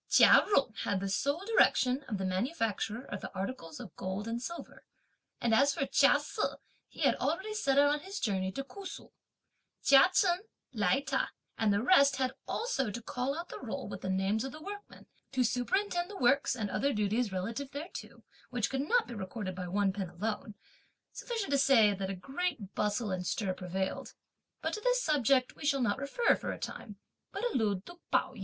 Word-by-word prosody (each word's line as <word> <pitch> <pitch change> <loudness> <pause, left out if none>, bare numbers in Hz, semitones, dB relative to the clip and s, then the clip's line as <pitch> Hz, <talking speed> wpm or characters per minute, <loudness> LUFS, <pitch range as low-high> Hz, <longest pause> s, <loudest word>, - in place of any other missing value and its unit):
Chia - - +8
Jung 275 - +2
had 200 - 0
the 195 - -3
sole 280 - 0
direction 280 - +3
of 215 - -2
the 190 - -2
manufacture 225 - -1
of - - -6
the - - -6
articles 190 -5 -5
in - - -8
gold 190 +3 -4
and 230 +1 -3
silver; 340 +7 -7 0.6
and 235 -1 +1
as 275 +5 +4
for 275 - 0
Chia - - +5
Se, - - -5 0.5
he - - -12
had - - +5
already 385 +5 -1
set 280 -11 +1
out 285 +1 +6
on 300 - -1
his 385 +6 -6
journey 190 -5 0
to 275 - -3
Ku 395 +8 -11
Su. 380 - -8 0.7
Chia 275 +5 +7
Chen, 360 -2 +3 0.3
Lai 235 +4 +2
Ta 270 -1 -1 0.3
and 220 -2 +2
the 200 +2 +1
rest 280 -3 +6
had 260 -1 0
also 445 - -1
to 210 - -4
call 250 +5 -3
out 340 +1 -6
the - - -7
roll - - -5
with - - -7
the 190 - -3
names 195 +3 +1
of 270 - -4
the 305 - -10
workmen, 405 +5 -9 0.3
to 260 -1 +3
superintend 350 - 0
the 410 - -8
works 265 +2 +3
and 210 -5 -3
other 280 +1 +1
duties 210 +2 0
relative 230 +9 -3
thereto, 290 +5 -8 0.3
which 240 -4 -1
could 265 0 0
not - - +4
be 245 - -7
recorded 195 -1 -5
by 180 0 -5
one 195 +1 +1
pen 195 -3 -4
alone; 210 +4 -4 0.6
sufficient 450 - -4
to 280 - +3
say 230 -7 +5
that 190 -1 -4
a 195 - -3
great 270 - -3
bustle 210 0 0
and 180 -1 -2
stir 195 -4 -1
prevailed, 185 +1 -4 0.5
but - - -1
to 425 - -3
this - - +2
subject 270 -3 +2
we - - -11
shall 280 -1 +2
not 235 -1 +1
refer 280 - +2
for - - -4
a - - -5
time, 210 -4 -7 0.4
but 400 - -5
allude 205 -5 0
to 350 0 -12
Pao - - +1
yü. - - -12
250 Hz, 205 wpm, -31 LUFS, 205-290 Hz, 0.7 s, Chia